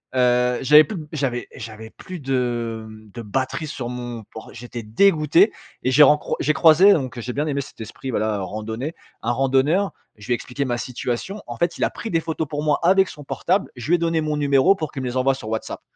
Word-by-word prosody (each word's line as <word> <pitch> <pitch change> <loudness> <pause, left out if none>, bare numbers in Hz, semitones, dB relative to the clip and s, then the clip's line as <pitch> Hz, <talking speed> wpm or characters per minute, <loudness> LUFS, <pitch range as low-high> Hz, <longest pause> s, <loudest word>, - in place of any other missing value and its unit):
Heu, 125 0 +3
j'avais 150 +3 +7
plus 215 0 -6
de 155 - -6
b - - -15
j'avais 130 -5 -2
j'avais 110 -2 -9
plus 185 -2 -9
de 120 -4 -2
mmh, 110 -1 -14
de 120 - -6
batterie 130 +8 -2
sur 120 -4 -5
mon 120 -2 -6
port 110 - -10
j'étais 120 0 -8
dégoûté 160 - +4 0.3
et 130 - +1
j'ai 150 +3 +7
rencroi 150 +2 +3
j'ai 155 - +2
croisé- 170 +7 +7
donc 130 -5 -2
j'ai 125 +1 -5
bien 150 +2 -1
aimé 140 -1 -1
cet - - -12
esprit 130 +4 -7
voilà, 110 -3 0
randonnée- 110 - -5 0.3
un 115 - 0
randonneur. 135 +9 +2 0.2
Je 105 - -13
lui 125 - +2
ai - - +3
expliqué 135 +3 -4
ma 120 -1 -1
situation, 125 - -4
en - - -7
fait 170 0 0
il - - -1
a - - +2
pris 225 - -6
des 165 - +2
photos 160 -1 -3
pour 150 +1 -4
moi 150 -1 +2
avec 190 +2 +4
son 145 - -10
portable, 185 +7 -1
je 125 +2 -7
lui 175 - +5
ai - - +2
donné 165 -1 +1
mon 150 -1 -1
numéro 145 +6 +4
pour 155 -6 -4
qu'il 135 - -5
me - - -2
les 125 +1 -3
envoie 135 +1 +3
sur 110 -5 -8
WhatsApp. 110 0 -4
135 Hz, 235 wpm, -22 LUFS, 120-155 Hz, 0.3 s, j'avais